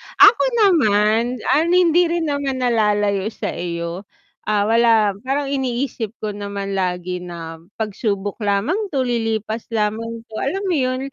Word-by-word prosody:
ako 415 +4 +7 0.2
naman, 230 - +3 0.2
ah, 320 +3 +3
hindi 350 -1 +4
rin 340 0 -1
naman 280 -3 -2
nalalayo 210 -4 +1
sa 220 - -4
iyo. 170 +2 -5 0.4
Ah, 210 -1 +2
wala 225 -1 +4 0.2
parang 275 0 -1
iniisip 250 -4 -2
ko 210 - -1
naman 200 -1 -5
lagi 180 -1 -2
na 165 -2 -8 0.2
pagsubok 205 -2 -3
lamang 205 - 0 0.2
'to, 260 - +2
lilipas 225 -2 -2
lamang 225 +1 -2
'to. 220 -1 -8
Alam 385 +9 -2
mo - - +2
yun, 255 -1 0
220 Hz, 140 wpm, -20 LUFS, 200-265 Hz, 0.4 s, ako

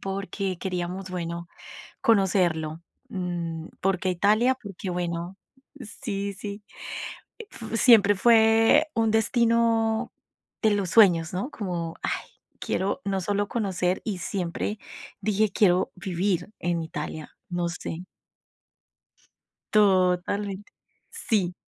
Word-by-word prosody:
porque 195 -1 -3
queríamos, 185 0 -4
bueno, 170 -1 -4 0.6
conocerlo, 175 -7 +2 0.3
mm, 170 -3 -4
¿por 190 -1 +1
qué 185 - -1
Italia? 215 +8 +3
Porque 195 -2 -6
bueno 175 0 -3 0.4
Sí, 200 -3 -4
sí 205 +1 -7 0.8
f 245 - -6
siempre 210 -5 +7
fue 225 +7 +5
un 225 -1 +2
destino 230 0 +2 0.5
de 220 -2 +4
los 195 -3 0
sueños, 175 -7 +5
¿no? 200 +11 -3
Como: 175 -7 -4
"Ay, - - -2 0.3
quiero 190 0 -1
no 195 -1 -1
solo 205 +2 0
conocer", 190 -5 -1
y 200 -5 -3
siempre 185 +3 -3 0.4
dije: 215 0 +2
"Quiero 185 -3 +3
vivir 180 +1 -1
en 170 -1 0
Italia". 155 -1 -6 0.2
No 175 -1 -1
sé. 170 0 -6 1.7
Totalmente, 195 0 +2 0.4
sí. 205 - 0
195 Hz, 105 wpm, -26 LUFS, 175-215 Hz, 1.7 s, siempre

